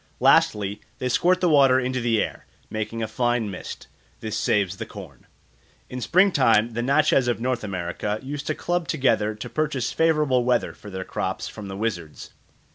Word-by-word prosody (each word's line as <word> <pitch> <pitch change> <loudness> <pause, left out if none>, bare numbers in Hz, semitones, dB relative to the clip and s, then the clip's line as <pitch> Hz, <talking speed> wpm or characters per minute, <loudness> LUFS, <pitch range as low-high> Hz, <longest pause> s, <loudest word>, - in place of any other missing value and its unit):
Lastly, 105 0 +3 0.2
they 125 - -2
squirt 180 +8 +2
the 180 - +3
water 135 -5 +5
into 125 0 -2
the 115 -2 +2
air, - - -8 0.2
making 110 +1 -3
a - - -2
fine 120 -1 0
mist. 90 - -8 0.3
This 110 -1 -4
saves 100 -3 +1
the - - -5
corn. - - -12 0.6
In 125 0 -5
spring 185 - +4
time 115 -7 +3
the 120 - -2
Natchez 135 0 +3
of 120 - 0
North 125 0 -1
America 100 +2 -3
used 145 +2 -5
to 155 - 0
club 175 -1 -2
together 115 -8 +1
to 105 - -7
purchase 150 -5 -1
favourable 150 -6 +2
weather 125 -1 +1
for 105 - -12
their 95 -1 -5
crops 95 - -3
from 105 -2 -8
the 95 0 -6
wizards. 90 -8 -4
120 Hz, 180 wpm, -24 LUFS, 105-140 Hz, 0.6 s, water